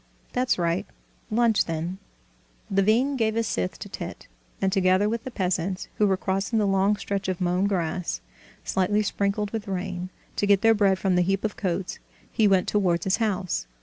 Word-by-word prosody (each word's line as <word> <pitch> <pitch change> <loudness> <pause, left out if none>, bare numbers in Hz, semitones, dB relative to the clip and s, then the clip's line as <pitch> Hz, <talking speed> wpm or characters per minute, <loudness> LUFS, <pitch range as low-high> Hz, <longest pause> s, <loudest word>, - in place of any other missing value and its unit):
That's 250 0 +1
right; 170 0 0 0.4
lunch, 230 -1 +3
then." 165 +3 -3 0.7
Levin 220 +8 +3
gave 220 -2 +1
his 230 0 +1
scythe 90 - -2
to - - -8
Tit, - - -7 0.3
and 190 -1 +1
together 190 +1 +3
with 225 +1 -2
the - - -3
peasants, 185 -3 -2
who 210 - +5
were 190 -1 +2
crossing 195 +4 -1
the 210 - +3
long 195 +1 +3
stretch 200 -1 -3
of 185 - -2
mown 180 +2 +1
grass, 180 -2 -1 0.4
slightly 205 +3 +1
sprinkled 200 0 -1
with 220 -2 -4
rain, 185 -1 -3 0.3
to 205 - +1
get 200 -1 +5
their 225 0 +6
bread 200 -3 +3
from 190 0 +1
the - - +4
heap 195 +2 0
of 215 -1 -1
coats, 190 -4 -2 0.3
he 220 - +3
went 190 -2 +3
towards 180 -5 +1
his 190 - +2
house. 190 - -1
195 Hz, 180 wpm, -25 LUFS, 185-210 Hz, 0.7 s, their